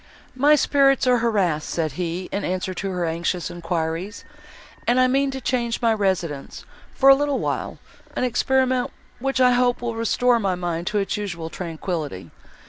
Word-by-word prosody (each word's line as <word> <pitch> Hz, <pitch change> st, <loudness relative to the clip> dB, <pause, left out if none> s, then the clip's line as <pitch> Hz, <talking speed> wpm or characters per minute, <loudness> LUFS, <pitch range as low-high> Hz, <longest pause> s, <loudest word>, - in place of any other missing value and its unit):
"My 290 Hz, +4 st, +5 dB
spirits 275 Hz, -2 st, +3 dB
are 250 Hz, -1 st, +4 dB
harassed," 195 Hz, -10 st, 0 dB
said 160 Hz, -3 st, -1 dB
he, 175 Hz, +4 st, -4 dB
in 200 Hz, -, -2 dB
answer 185 Hz, +1 st, -2 dB
to 195 Hz, +2 st, -4 dB
her 180 Hz, -2 st, -2 dB
anxious 170 Hz, +2 st, -2 dB
enquiries, 170 Hz, +3 st, -3 dB, 0.6 s
"and 245 Hz, +2 st, +3 dB
I 255 Hz, -, +6 dB
mean 275 Hz, +2 st, +2 dB
to 265 Hz, 0 st, -4 dB
change 240 Hz, -2 st, -1 dB
my 230 Hz, -1 st, +3 dB
residence, 185 Hz, -9 st, -2 dB, 0.3 s
for 270 Hz, -, +3 dB
a -, -, +11 dB
little 285 Hz, 0 st, +1 dB
while, -, -, -3 dB, 0.4 s
an -, -, -1 dB
experiment, 255 Hz, +1 st, +1 dB, 0.3 s
which, 270 Hz, +1 st, -1 dB
I 250 Hz, -1 st, +6 dB
hope, 245 Hz, 0 st, +2 dB
will 240 Hz, -1 st, -3 dB
restore 235 Hz, +2 st, +2 dB
my 195 Hz, -4 st, 0 dB
mind 175 Hz, -1 st, -3 dB
to 210 Hz, -, 0 dB
its 195 Hz, 0 st, -1 dB
usual 175 Hz, -6 st, -5 dB
tranquillity. 160 Hz, -, -5 dB
205 Hz, 170 wpm, -23 LUFS, 175-250 Hz, 0.6 s, a